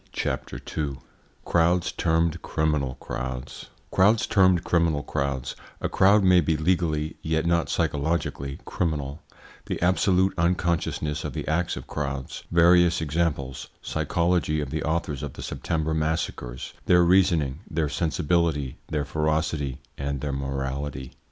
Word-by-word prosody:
CHAPTER 65 Hz, 0 st, -3 dB, 0.2 s
II 70 Hz, -4 st, -2 dB, 0.5 s
CROWDS 85 Hz, +1 st, +2 dB
TERMED 80 Hz, 0 st, +1 dB
CRIMINAL 75 Hz, -5 st, 0 dB
CROWDS 65 Hz, 0 st, -6 dB, 0.2 s
Crowds 105 Hz, +4 st, +4 dB
termed 95 Hz, -4 st, +4 dB
criminal 80 Hz, -4 st, +1 dB
crowds 70 Hz, -2 st, -2 dB, 0.2 s
A -, -, -2 dB
crowd 100 Hz, +2 st, +5 dB
may 90 Hz, -1 st, +6 dB
be 80 Hz, 0 st, +1 dB
legally 80 Hz, -2 st, 0 dB
yet 80 Hz, 0 st, 0 dB
not 85 Hz, -1 st, +2 dB
psychologically 75 Hz, -3 st, -1 dB
criminal 75 Hz, -3 st, -2 dB, 0.5 s
The -, -, -2 dB
absolute 95 Hz, +1 st, +3 dB
unconsciousness 85 Hz, -3 st, 0 dB
of -, -, -4 dB
the -, -, -5 dB
acts 85 Hz, +2 st, 0 dB
of -, -, -7 dB
crowds 70 Hz, -3 st, -4 dB
Various 85 Hz, 0 st, +5 dB
examples 75 Hz, -4 st, -1 dB, 0.2 s
Psychology 85 Hz, 0 st, 0 dB
of 75 Hz, -3 st, -4 dB
the 80 Hz, -, -2 dB
authors 75 Hz, -3 st, -1 dB
of 75 Hz, -3 st, -5 dB
the -, -, -8 dB
September 80 Hz, -1 st, -2 dB
massacres 75 Hz, -6 st, -2 dB
Their 90 Hz, 0 st, +6 dB
reasoning, 85 Hz, -6 st, +3 dB
their 80 Hz, -1 st, 0 dB
sensibility, 80 Hz, -2 st, 0 dB
their 75 Hz, -2 st, -1 dB
ferocity, 75 Hz, -2 st, -1 dB, 0.2 s
and 70 Hz, 0 st, -2 dB
their 70 Hz, -2 st, -2 dB
morality. 70 Hz, 0 st, -3 dB
80 Hz, 130 wpm, -25 LUFS, 70-85 Hz, 0.5 s, may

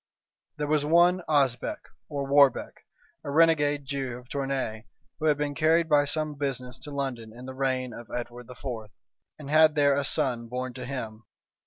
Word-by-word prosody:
There 150 Hz, -, -1 dB
was 150 Hz, 0 st, +1 dB
one 175 Hz, +4 st, +4 dB
Osbec, 135 Hz, -5 st, +1 dB, 0.3 s
or 140 Hz, -1 st, -3 dB
Warbec, 140 Hz, -2 st, +3 dB, 0.4 s
a -, -, -6 dB
renegade 145 Hz, -2 st, +3 dB
Jew 135 Hz, -3 st, -3 dB
of 125 Hz, 0 st, -15 dB
Tournay, 135 Hz, -5 st, -3 dB, 0.3 s
who 155 Hz, -, -2 dB
had 150 Hz, -2 st, +3 dB
been 145 Hz, -1 st, -2 dB
carried 160 Hz, +2 st, +3 dB
by 145 Hz, -2 st, +4 dB
some 155 Hz, +1 st, -1 dB
business 130 Hz, -3 st, -3 dB
to 150 Hz, -, -10 dB
London 135 Hz, -6 st, -4 dB
in 120 Hz, +3 st, -11 dB
the 130 Hz, -, -7 dB
reign 130 Hz, -2 st, -1 dB
of 115 Hz, -1 st, -10 dB
Edward 120 Hz, 0 st, -6 dB
IV., 125 Hz, +2 st, -12 dB, 0.7 s
and 145 Hz, -2 st, -8 dB
had 155 Hz, 0 st, +6 dB
there 145 Hz, -2 st, +4 dB
a 140 Hz, -, 0 dB
son 130 Hz, -5 st, 0 dB
born 125 Hz, +1 st, -4 dB
to 125 Hz, 0 st, -7 dB
him. 115 Hz, -5 st, -6 dB
140 Hz, 175 wpm, -27 LUFS, 125-150 Hz, 0.7 s, had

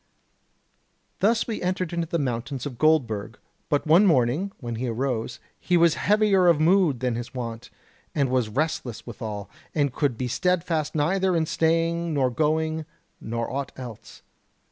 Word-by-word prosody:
"Thus 220 Hz, +3 st, +3 dB
we 225 Hz, -, -4 dB
entered 180 Hz, -1 st, -1 dB
into 170 Hz, -1 st, -1 dB
the 170 Hz, -, -1 dB
mountains 130 Hz, -1 st, -3 dB
of 130 Hz, -4 st, -6 dB
Goldburg; 115 Hz, -9 st, +1 dB, 0.3 s
but 145 Hz, -, +1 dB
one 170 Hz, +7 st, +6 dB
morning, 150 Hz, +5 st, +2 dB
when 120 Hz, -2 st, -5 dB
he 125 Hz, +2 st, -2 dB
arose, 120 Hz, -1 st, -2 dB, 0.2 s
he 180 Hz, -, +2 dB
was 170 Hz, -1 st, +5 dB
heavier 205 Hz, -3 st, +3 dB
of 170 Hz, -3 st, +5 dB
mood 160 Hz, -6 st, +3 dB
than 125 Hz, -2 st, 0 dB
his 120 Hz, +3 st, -6 dB
wont, 115 Hz, -1 st, -5 dB, 0.5 s
and 140 Hz, -4 st, +2 dB
was 125 Hz, -4 st, +1 dB
restless 130 Hz, -2 st, -2 dB
withal, 105 Hz, -3 st, -6 dB, 0.3 s
and 145 Hz, -4 st, +1 dB
could 135 Hz, -6 st, 0 dB
be 125 Hz, -, -2 dB
steadfast 165 Hz, +2 st, 0 dB
neither 185 Hz, +5 st, +1 dB
in 160 Hz, -1 st, +2 dB
staying 165 Hz, +1 st, +1 dB
nor 130 Hz, -3 st, +2 dB
going, 155 Hz, +2 st, 0 dB, 0.3 s
nor 115 Hz, +1 st, -3 dB
aught 140 Hz, 0 st, -3 dB
else. 120 Hz, -5 st, -10 dB
150 Hz, 155 wpm, -25 LUFS, 120-170 Hz, 0.5 s, one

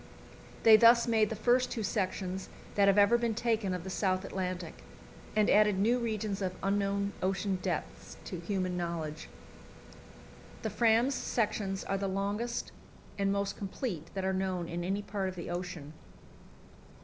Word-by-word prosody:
They 220 Hz, -1 st, +9 dB
thus 235 Hz, +1 st, +6 dB
made 220 Hz, -2 st, +3 dB
the 220 Hz, -, -3 dB
first 245 Hz, +4 st, +2 dB
two 225 Hz, -, -3 dB
sections 190 Hz, -1 st, -2 dB, 0.2 s
that 200 Hz, -1 st, +4 dB
have 200 Hz, 0 st, +4 dB
ever 205 Hz, +4 st, +5 dB
been 235 Hz, -2 st, 0 dB
taken 225 Hz, -4 st, 0 dB
of 180 Hz, -2 st, -3 dB
the 190 Hz, -, -6 dB
South 185 Hz, -1 st, 0 dB
Atlantic, 180 Hz, -3 st, -4 dB, 0.6 s
and 215 Hz, -1 st, +4 dB
added 210 Hz, -2 st, +4 dB
new 230 Hz, +6 st, +3 dB
regions 215 Hz, -3 st, -2 dB
of 185 Hz, -1 st, -1 dB
the 190 Hz, -, -5 dB
unknown 200 Hz, 0 st, 0 dB
ocean 190 Hz, 0 st, 0 dB
depths -, -, -4 dB
to 180 Hz, -, -5 dB
human 185 Hz, 0 st, -2 dB
knowledge. 165 Hz, -3 st, -4 dB, 1.3 s
The -, -, -2 dB
Fram's 235 Hz, +3 st, +3 dB
sections 210 Hz, -6 st, -1 dB
are 195 Hz, -, -2 dB
the 195 Hz, -, -1 dB
longest 205 Hz, +5 st, -2 dB, 0.5 s
and 195 Hz, 0 st, +2 dB
most 200 Hz, 0 st, -1 dB
complete 195 Hz, -, -4 dB
that 190 Hz, -1 st, -2 dB
are 190 Hz, -, +1 dB
known 185 Hz, -2 st, -1 dB
in 175 Hz, 0 st, -4 dB
any 195 Hz, +3 st, -1 dB
part 195 Hz, -2 st, -2 dB
of 185 Hz, -, -8 dB
the 170 Hz, -1 st, -6 dB
ocean. 175 Hz, -4 st, -5 dB
195 Hz, 160 wpm, -31 LUFS, 185-215 Hz, 1.3 s, They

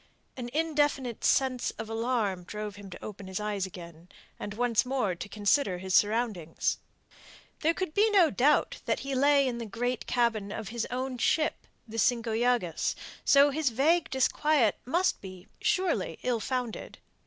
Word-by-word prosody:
An 245 Hz, -2 st, -5 dB
indefinite 290 Hz, -6 st, 0 dB
sense 260 Hz, -2 st, +2 dB
of 225 Hz, -, -5 dB
alarm 225 Hz, -5 st, -1 dB
drove 210 Hz, +2 st, -6 dB
him 200 Hz, -1 st, -11 dB
to 180 Hz, -, -9 dB
open 205 Hz, -2 st, -8 dB
his 190 Hz, +1 st, -4 dB
eyes 205 Hz, -2 st, -2 dB
again, 170 Hz, -2 st, -12 dB, 0.3 s
and 205 Hz, -, -6 dB
once 240 Hz, -1 st, +2 dB
more 250 Hz, -7 st, 0 dB
to 180 Hz, +3 st, -7 dB
consider 205 Hz, -1 st, +1 dB
his 185 Hz, +1 st, -4 dB
surroundings. 205 Hz, -5 st, +1 dB, 0.8 s
There 330 Hz, +1 st, +1 dB
could 370 Hz, -5 st, -3 dB
be 425 Hz, +4 st, +4 dB
no 370 Hz, -7 st, +5 dB
doubt 285 Hz, +5 st, +2 dB
that -, -, 0 dB
he 275 Hz, 0 st, -4 dB
lay 280 Hz, +1 st, +4 dB
in 240 Hz, -2 st, -3 dB
the 230 Hz, -, -4 dB
great 245 Hz, +4 st, -3 dB
cabin 225 Hz, -5 st, 0 dB
of 215 Hz, -2 st, -5 dB
his 235 Hz, 0 st, -3 dB
own 255 Hz, 0 st, -3 dB
ship, 310 Hz, +6 st, +1 dB, 0.2 s
the 225 Hz, +1 st, -5 dB
Cinco 230 Hz, +1 st, +1 dB
Llagas, 230 Hz, -7 st, +1 dB, 0.3 s
so 280 Hz, 0 st, +6 dB
that -, -, -5 dB
his 310 Hz, -4 st, +2 dB
vague 305 Hz, +9 st, +2 dB
disquiet 265 Hz, -2 st, +2 dB
must 345 Hz, +9 st, +1 dB
be, 185 Hz, -1 st, -10 dB, 0.2 s
surely, 375 Hz, 0 st, 0 dB
ill 245 Hz, -2 st, 0 dB
founded. 250 Hz, -1 st, -4 dB
240 Hz, 165 wpm, -29 LUFS, 205-275 Hz, 0.8 s, so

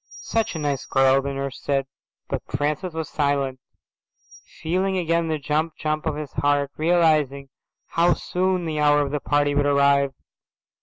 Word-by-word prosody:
"Such 225 Hz, -5 st, -1 dB
a -, -, -2 dB
nice 145 Hz, -3 st, -2 dB
girl," 135 Hz, 0 st, +4 dB
the 140 Hz, +1 st, -3 dB
nurse 135 Hz, 0 st, -5 dB
said. 135 Hz, -1 st, 0 dB, 0.4 s
But -, -, -3 dB
Francis 150 Hz, +4 st, -2 dB
was 160 Hz, -2 st, -3 dB
silent, 140 Hz, -3 st, -1 dB, 1.0 s
feeling 185 Hz, +4 st, 0 dB
again 170 Hz, -1 st, +1 dB
the 160 Hz, -1 st, -1 dB
jump 155 Hz, +3 st, -1 dB
jump 155 Hz, +1 st, -2 dB
of 155 Hz, -, -1 dB
his 150 Hz, -1 st, -6 dB
heart, 145 Hz, -1 st, +1 dB
realizing 155 Hz, -5 st, +2 dB, 0.4 s
how 175 Hz, +1 st, +2 dB
soon 185 Hz, -1 st, -1 dB
the 155 Hz, -2 st, -2 dB
hour 145 Hz, 0 st, +4 dB
of 140 Hz, -, -4 dB
the 150 Hz, -, -1 dB
party 145 Hz, 0 st, +1 dB
would 145 Hz, 0 st, +2 dB
arrive. 140 Hz, -1 st, +3 dB
150 Hz, 160 wpm, -23 LUFS, 140-160 Hz, 1.0 s, girl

